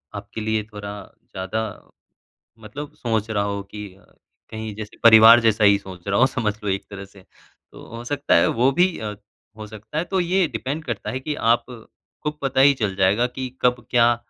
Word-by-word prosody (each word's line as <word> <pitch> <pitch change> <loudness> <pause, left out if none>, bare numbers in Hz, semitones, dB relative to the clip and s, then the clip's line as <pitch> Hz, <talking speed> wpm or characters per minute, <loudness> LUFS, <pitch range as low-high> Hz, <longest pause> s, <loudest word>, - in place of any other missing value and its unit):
आपके 110 - -7
लिए 110 0 -1
थोड़ा 105 0 -7 0.3
ज़्यादा 95 +4 -3 1.0
मतलब 135 +7 -8
सोच 110 -2 -2
रहा 100 -2 0
हो 100 0 -3
कि 105 0 -7
अ, 95 - -23 0.5
कहीं 110 -1 -6
जैसे 110 -1 -8
परिवार 115 +1 +9
जैसा 110 -2 +2
ही 100 0 +6
सोच 95 -1 -11
रहा 100 0 +1
हो 130 - +6
समझ 115 -6 -2
लो - - -2
एक 95 0 -2
तरह 100 -1 -8
से। 95 -1 -18 0.5
तो - - -13
हो 120 - -8
सकता 145 +3 0
है 85 - +4
वो 125 +3 +2
भी 180 +4 +2
अ, 105 -1 -5 0.4
हो 110 - -7
सकता 110 +7 -8
है, 165 - 0
तो 190 +1 -1
ये 180 +1 +2
डिपेंड 130 +7 -4
करता 115 -7 -4
है 130 - -4
कि 150 +3 -4
आप 115 -2 +2 0.6
को 150 - -1
पता 135 -1 0
ही 140 +1 +6
चल 105 -7 -2
जाएगा 100 +5 +3
कि 130 +1 -6
कब 125 -1 +1
क्या 120 -1 +4
110 Hz, 200 wpm, -22 LUFS, 105-130 Hz, 1.0 s, परिवार